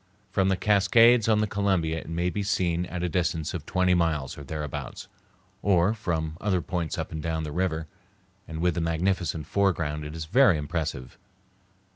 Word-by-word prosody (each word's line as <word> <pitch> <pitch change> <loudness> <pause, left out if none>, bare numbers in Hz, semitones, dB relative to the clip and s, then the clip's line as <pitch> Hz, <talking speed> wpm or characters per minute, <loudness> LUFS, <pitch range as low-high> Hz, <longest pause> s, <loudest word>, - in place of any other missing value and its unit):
From 95 -1 +2
the 95 - +1
Cascades 110 +4 +5
on 105 -1 +4
the - - +2
Columbia 95 -6 0
it 80 - -10
may 85 +2 -1
be 105 - -2
seen 90 -3 0
at 90 -1 -4
a - - +1
distance 85 -3 -1
of 80 -5 -6
twenty 90 -1 +2
miles 80 -6 0
or 75 - -9
thereabouts, 75 -1 -6 0.5
or 95 +1 +3
from 80 -7 -3
other 95 -3 +1
points 85 -1 -3
up - - -4
and 80 - -4
down 80 0 -2
the 75 - -5
river, 80 -1 -1 0.6
and 80 0 -5
with 90 0 +2
the 85 - -2
magnificent 85 -1 -1
foreground 80 -5 0
it 75 +1 -7
is 80 -1 -5
very 110 - +5
impressive. 75 -4 -4
85 Hz, 180 wpm, -26 LUFS, 80-95 Hz, 0.6 s, Cascades